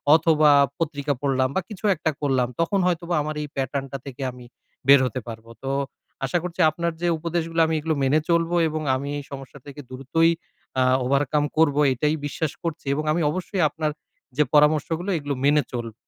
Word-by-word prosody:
অথবা, 155 -2 +4 0.3
পত্রিকা 145 -3 -1
পড়লাম 130 -2 +1
বা, 190 - +2
কিছু 210 -1 -7
একটা 160 -1 -1
করলাম। 130 -4 +1
তখন 185 +4 +1
হয়তোবা 170 0 -1
আমার 155 +1 -4
এই 150 - -4
pattern 135 +1 -2
টা 135 - -3
থেকে 135 -1 -8
আমি 125 0 -13 0.4
বের 140 0 +8
হতে 130 0 -3
পারবো। 115 0 -9
তো 135 - -2 0.5
আশা 135 +7 0
করছি 180 0 -6
আপনার 170 +2 -2
যে 175 - +1
উপদেশগুলো, 165 0 -2
আমি 160 - 0
এগুলো 160 +1 -1
মেনে 140 +3 +3
চলবো 170 0 +2
এবং 155 0 -3
আমি 140 +2 -4
এই 145 - -5
সমস্যা 135 0 -9
থেকে 145 0 -9
দ্রুতই 135 +6 +1 0.5
আ - - +5 0.2
overcome 145 +2 +1
করবো। 150 -3 +3
এটাই 150 +5 0
বিশ্বাস 145 +1 -2
করছি 165 -3 -4
এবং 150 +2 -2
আমি 170 +3 +1
অবশ্যই 185 +2 -3
আপনার 155 0 -2 0.5
যে 150 - +5
পরামর্শগুলো, 155 +4 +3
এগুলো 145 -2 -3
মেনে 145 +1 +4
চলবো। 115 -2 -4
150 Hz, 185 wpm, -24 LUFS, 140-165 Hz, 0.5 s, বের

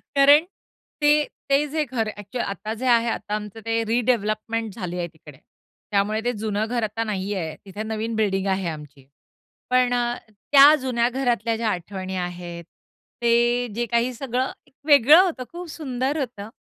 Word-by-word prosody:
कारण 285 +3 +6 0.6
ते 295 0 +5 0.3
ते 275 +2 +3
जे 310 +1 0
घर 230 -4 -2
ॲक्चुअली 205 +5 -4
आता 210 +2 -5
जे 250 +3 -6
आहे, 235 -1 +4
आता 210 -1 -3
आमचं 210 +1 -6
ते 225 0 0
रिडेव्हलपमेंट 225 -2 0
झाली 180 -5 -5
आहे 175 -1 -2
तिकडे, 160 -4 -16 0.5
त्यामुळे 210 +2 +1
ते 245 - +2
जुनं 215 -1 -2
घर 240 -1 -1
आता 220 +2 -2
नाहीये. 190 -6 -3
तिथे 200 +2 -6
नवीन 220 +1 -3
बिल्डिंग 200 -3 0
आहे 190 -2 0
आमची. 145 -3 -10 0.6
पण 250 -1 +3
अ, 240 0 0
त्या 280 +8 +6
जुन्या 240 -2 +1
घरातल्या 240 -3 0
ज्या 225 -1 0
आठवणी 190 +1 -4
आहेत, 175 -1 -5 0.6
ते 240 +1 +3
जे 240 +1 -1
काही 235 +2 0
सगळं 255 +1 -2 0.2
एक - - -27
वेगळं 290 +4 +8
होतं, 330 -9 -2
खूप 345 -1 -8
सुंदर 270 -2 -2
होतं. 220 -6 -5
225 Hz, 160 wpm, -23 LUFS, 200-250 Hz, 0.6 s, वेगळं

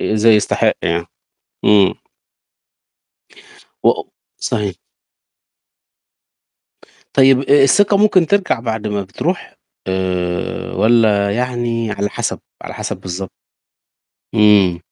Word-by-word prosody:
آآ، - - -2
إزاي 110 +1 +4
يستحق 105 - +1
يعني؟ 85 0 -1 0.6
إمم 100 -2 +4 1.9
و - - +6 0.5
صحيح. 100 -4 -3 2.4
طيب 135 -1 +5
آآ، 140 +1 +4
الثقة 200 +9 +4
ممكن 195 -4 +3
ترجع 195 -8 0
بعد 110 -2 -4
ما 105 -1 -2
بتروح، 95 0 -4 0.3
آآ، 90 -2 -3
والّا 110 -3 +2
يعني 120 0 -2
على 100 0 -2
حسب، - - -3 0.2
على - - -8
حسب - - -5
بالضبط؟ 95 +1 -6 1.1
إمم. 105 -5 +4
105 Hz, 95 wpm, -17 LUFS, 95-125 Hz, 2.4 s, و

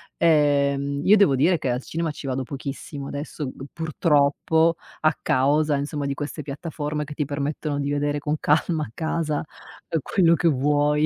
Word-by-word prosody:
ehm, 140 -3 +2
io 210 +5 +6
devo 175 -10 +5
dire 165 +6 +3
che 130 - -2
al 125 +2 -1
cinema 165 -1 -2
ci 150 - -9
vado 130 0 -2
pochissimo 140 +1 -6
adesso 145 0 -5
g 135 - -9
purtroppo, 160 +1 +2 0.3
a 155 +1 +4
causa 145 +3 +2
insomma 145 +1 -3
di 140 - -1
queste 145 +2 -5
piattaforme 150 0 -4
che 150 0 -8
ti 150 - -1
permettono 145 +1 -3
di 140 - -2
vedere 145 0 0
con 150 +1 -1
calma 155 +1 +1
a - - -13
casa 160 -1 -1 0.6
quello 170 +2 +3
che 170 - +1
vuoi 145 +1 +2
150 Hz, 170 wpm, -24 LUFS, 140-155 Hz, 0.6 s, io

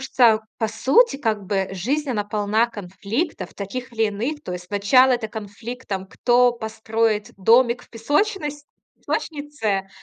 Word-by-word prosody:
что, 240 -4 +4 0.2
по 220 - +1
сути, 275 - +3
как 220 -7 -1
бы 195 -1 0
жизнь, 265 +11 -2
она 210 -4 -1
полна 210 +2 +1
конфликтов 215 - -4
таких 245 +6 -6
или 225 -1 +1
иных. 250 +9 -3
То 180 - -6
есть, 180 0 -6
сначала 210 +7 +4
это 235 -3 -1
конфликт, 220 +4 -8
там 190 -2 -3
кто 245 +4 +3
построит 220 -1 -1
домик 235 +5 +4
в - - -26
песочност 295 - -1 0.3
песочнице, 285 -11 -3
225 Hz, 145 wpm, -22 LUFS, 205-260 Hz, 0.3 s, что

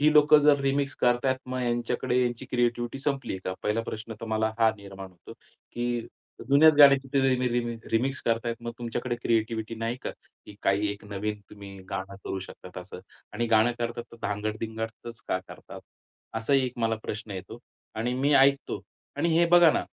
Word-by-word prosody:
ही 150 +1 +5
लोकं 150 0 +7
जर 145 -1 +5
रिमिक्स 140 0 0
करताहेत 125 +2 +2
मग 130 0 -3
यांच्याकडे 120 +1 0
यांची 120 +1 -2
क्रिएटिव्हिटी 120 +1 0
संपली 135 -6 -2
का? 95 - -2
पहिला 105 +2 +1
प्रश्न 110 0 -6
तर 115 - -6
मला 110 0 +1
हा 115 -1 +5
निर्माण 95 -1 -10
होतो. 90 -2 -14 0.4
की 120 -1 -2 0.4
जुन्याच 155 +3 +7
गाण्याची 140 -2 +7
रि 135 -1 +3
रि 125 0 +1
रिमेक 120 -1 -3
रिमिक्स 130 +4 +1
करतायेत 115 0 0
मग 120 0 -4
तुमच्याकडे 120 +1 -3
क्रिएटिव्हिटी 115 -1 -1
नाही 115 +2 -3
का? - - -3
की 105 - -17
काही 100 +2 +2
एक 100 +1 -12
नवीन 105 +1 -4
तुम्ही 100 -1 -11
गाणं 95 +1 -5
करू 95 - -3
शकतात 90 0 -10
असं 90 0 -9 0.3
आणि 120 +3 -1
गाणं 115 +1 +4
करतात, 120 0 -3
तर - - -11
धांगड-धिंगडच 110 +2 -4
का 95 - +1
करतात, - - -11 0.6
असाही 135 +4 +2
एक 125 - -5
मला 115 -1 +1
प्रश्न 110 0 -6
येतो 95 +4 -7 0.4
आणि 115 +3 -1
मी 140 +3 +1
ऐकतो 140 0 +3 0.3
आणि 170 - +1
हे 170 - +5
बघा 175 -1 +7
ना. - - 0
120 Hz, 175 wpm, -27 LUFS, 110-130 Hz, 0.6 s, लोकं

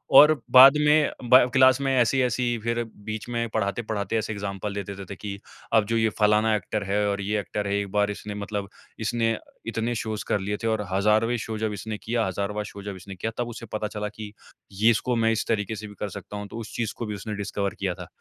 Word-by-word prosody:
और 150 +2 +10 0.2
बाद 130 +2 +10
में 150 -1 +4 0.2
बा 130 - +10 0.2
क्लास 130 0 +6
में 135 -1 +1
ऐसी-ऐसी 120 -1 +2
फिर 115 0 0 0.2
बीच 110 +1 -5
में 115 -1 -1
पढ़ाते-पढ़ाते 110 +1 -1
ऐसे 110 0 -2
एग्ज़ामपल 100 0 -4
देते-देते 100 -1 -6
कि 100 0 -6 0.3
अब 110 -2 +5
जो 115 - +1
ये 110 -1 +3
फलाना 105 +1 +4
एक्टर 105 0 -2
है 100 +1 0
और 100 0 -1
ये 105 +1 0
एक्टर 100 0 -3
है 100 - 0
एक 100 -1 -4
बार 105 0 +2
इसने 105 0 -7
मतलब 100 -1 -4 0.3
इसने 115 0 0 0.3
इतने 115 +1 -1
शोज़ 110 -1 -3
कर 105 - +1
लिए 100 +2 -2
थे - - +1
और 110 -1 +1
हज़ारवें 105 +5 +3
शो 110 -1 -4
जब 110 -1 -1
इसने 105 +2 -5
किया, 115 +1 -1
हज़ारवाँ 100 +3 -2
शो 100 -1 -9
जब 100 -1 -5
इसने 95 +1 -10
किया 110 +5 -3
तब 120 -1 -1
उसे 115 0 -8
पता 105 0 -1
चला 105 0 -4
कि 105 -2 -7 0.4
ये 110 +4 +4
इसको 120 +2 0
मैं 115 0 +3
इस 110 - -2
तरीके 105 0 -1
से 105 0 -7
भी 105 - -12
कर 105 - -3
सकता 105 +3 -8
हूँ। 105 0 -6
तो 115 - -9
उस 110 - -8
चीज़ 115 -3 -2
को 120 - -3
भी 105 -1 -4
उसने 105 +1 -5
डिस्कवर 100 -1 -2
किया 95 -3 -1
था। - - -9
105 Hz, 230 wpm, -25 LUFS, 100-115 Hz, 0.4 s, और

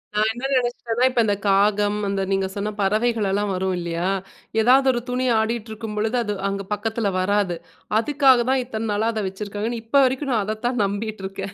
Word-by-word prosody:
நான் 215 +1 +3
என்ன 240 +4 -6
நெனைச்சிட்டேன்னா, 240 -1 0
இப்ப 250 - -1
இந்த 205 -1 +1
காகம், 205 +1 +3
அந்த 195 0 -1
நீங்க 195 0 +1
சொன்ன 205 +1 -2
பறவைகள்லாம் 205 -1 +1
வரும் 185 0 -1
இல்லையா? 170 +1 -2 0.5
எதாவது 265 +4 +5
ஒரு 240 -1 -2
துணி 255 +1 -1
ஆடியிட்டு 225 0 -2
இருக்கும் 215 -1 -6
பொழுது 220 +4 0
அது 210 -2 -2
அங்கே 195 0 -3
பக்கத்தில 215 0 -1
வராது. 195 -1 +1 0.4
அதுக்காக 265 -2 +4
தான் 265 -1 +2
இத்தன 225 -2 -4
நாளா 215 +2 +1
அத 215 - -2
வச்சுருக்காங்கன்னு 210 +4 -4
இப்ப 280 +5 +4
வரைக்கும் 265 +1 -1
நான் 220 -3 +1
அதைத்தான் 220 +2 -1
நம்பிகிட்டு 205 +1 -4
இருக்கேன். 195 0 -7
215 Hz, 175 wpm, -22 LUFS, 200-240 Hz, 0.5 s, எதாவது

